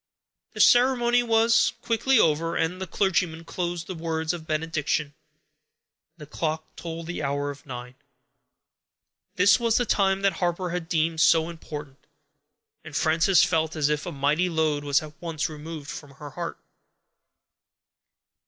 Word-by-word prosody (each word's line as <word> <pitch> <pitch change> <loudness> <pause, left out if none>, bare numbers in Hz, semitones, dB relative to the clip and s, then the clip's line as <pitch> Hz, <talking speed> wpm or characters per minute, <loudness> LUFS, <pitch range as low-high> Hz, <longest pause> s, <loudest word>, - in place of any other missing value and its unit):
The - - -9
ceremony 245 -1 +5
was 225 -1 +3
quickly 235 +3 +2
over, 165 -3 +2
and 165 +2 0
as 185 - -12
the 190 - -5
clergyman 175 -3 0
closed 175 -1 -3
the 185 - -6
words 160 -1 -2
of 160 -2 -8
benediction, 155 -2 -1 1.0
the 150 - -10
clock 155 +1 -4
told 165 -1 -6
the 175 +1 -5
hour 145 0 -1
of 145 +1 -14
nine. 125 -1 -7 1.4
This 190 +5 +5
was 230 -1 +2
the 245 - +1
time 195 -2 +1
that 195 -2 +3
Harper 175 0 -1
had 175 -1 -4
deemed 160 -1 +1
so 165 -1 +4
important, 150 -4 -9 0.8
and - - -10
Frances 160 +3 +4
felt 160 -3 0
as 150 -2 +1
if 150 -1 -1
a - - -3
mighty 150 +6 +1
load 155 -3 0
was 145 0 +2
at 150 -1 -10
once 165 -3 -2
removed 155 -1 -8
from 140 -2 -10
her 145 0 -10
heart. 170 +2 -5
165 Hz, 150 wpm, -25 LUFS, 150-185 Hz, 1.4 s, ceremony